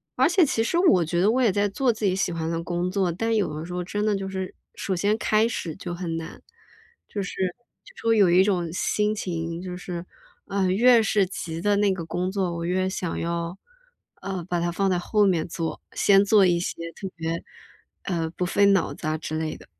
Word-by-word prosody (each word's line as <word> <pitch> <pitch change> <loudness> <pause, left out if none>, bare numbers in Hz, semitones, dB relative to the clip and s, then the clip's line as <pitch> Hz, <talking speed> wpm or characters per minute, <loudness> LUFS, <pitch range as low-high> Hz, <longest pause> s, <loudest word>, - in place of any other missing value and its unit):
而 260 +4 +4
且 355 -1 +5
其 225 -5 0
实 230 - 0
我 335 - +5
觉 170 +2 -1
得， 195 +4 +4
我 255 +3 +2
也 230 - +4
在 205 +2 +1
做 245 +6 +1
自 220 -2 -3
己 185 - +2
喜 190 - 0
欢 165 -1 -3
的 165 0 -2
工 175 +1 -1
作， 190 -2 0
但 225 +6 -1
有 200 -8 0
的 160 - -5
时 180 - -7
候 180 - -2
真 205 +4 -2
的 210 - +2
就 195 -1 -4
是 190 -1 -5 0.2
首 190 - -2
先 205 +5 +1
开 215 0 +2
始 170 -8 -4
就 180 -3 -6
很 175 -2 -4
难。 165 0 -8 0.7
就 205 - -3
是 185 - -5 0.5
就 - - -16
说 230 - +1
有 205 -5 +5
一 180 +2 +6
种 180 -4 0
心 210 +3 0
情， 170 -3 -4
就 180 -1 -6
是， 180 -1 -6 0.4
嗯， 190 -2 +1
越 240 +2 +6
是 205 -2 +2
急 165 -3 -5
的 205 +2 +2
那 200 -1 +3
个 180 -3 -5
工 180 +3 -2
作， 190 -3 -1
我 170 - -3
越 185 +2 0
想 180 -3 -3
要， 170 +1 -3 0.6
呃， 190 -3 -4
把 175 - 0
它 170 0 0
放 195 +3 0
在 180 -2 +1
后 210 +3 +2
面 175 -4 +1
做， 165 -1 -4
先 200 0 +5
做 200 -1 +5
一 175 -1 +3
些 170 - -2 0.2
特 195 - -6
别， 165 0 -3 0.6
呃， 165 -3 -2
不 180 - -2
费 200 +3 +3
脑 195 -2 +3
子 155 - -6
啊 155 - +1
的 - - -1
之 155 0 -4
类 160 -1 -2
的。 - - -14
185 Hz, 250 characters per minute, -25 LUFS, 170-205 Hz, 0.7 s, 一